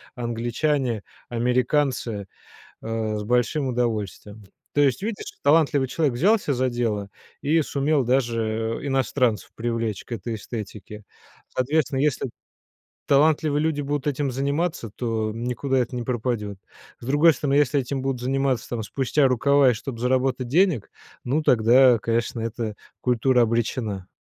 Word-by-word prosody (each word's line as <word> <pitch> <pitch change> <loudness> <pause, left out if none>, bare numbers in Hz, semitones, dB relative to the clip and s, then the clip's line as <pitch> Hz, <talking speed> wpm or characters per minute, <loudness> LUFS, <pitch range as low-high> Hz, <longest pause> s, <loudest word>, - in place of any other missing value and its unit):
англичане, 120 0 -1 0.3
американцы, 125 -3 0 0.6
э, 110 -1 -2
с - - -4
большим 125 +5 +1
удовольствием. 110 -4 -3 0.3
То 145 - +4
есть, 135 0 +2
видишь, 215 0 -4
талантливый 145 -2 +3
человек 145 -2 0
взялся 190 - +2
за 130 0 +1
дело 115 -5 -2 0.3
и 160 +3 +2
сумел 140 0 +1
даже 115 -3 0
иностранцев 130 -4 0
привлечь 115 -3 -2
к - - -12
этой 115 +1 -4
эстетике. 105 -1 -7 0.5
Соответственно, 135 +1 0
если 140 -2 0 0.8
талантливые 150 +1 +3
люди 155 -2 0
будут 145 0 -2
этим 140 -1 -1
заниматься, 140 -1 -1
то 110 -3 -1
никуда 125 +4 -1
это 125 0 -1
не 120 - -2
пропадет. 115 -4 -2 0.4
С - - -11
другой 145 +5 +5
стороны, 140 -2 -1
если 145 -1 +3
этим 135 +1 -3
будут 135 -2 -2
заниматься, 130 -1 0
там, 120 -2 -2
спустя 135 +5 +1
рукава 140 +2 +4
и - - +1
чтоб 115 +1 -7
заработать 130 0 0
денег, 160 - +2 0.3
ну, 140 +6 0
тогда, 120 +1 +5
конечно, 115 +1 -1
эта 115 -1 -3 0.3
культура 125 0 +3
обречена. 115 -4 -1
125 Hz, 135 wpm, -24 LUFS, 115-140 Hz, 0.8 s, другой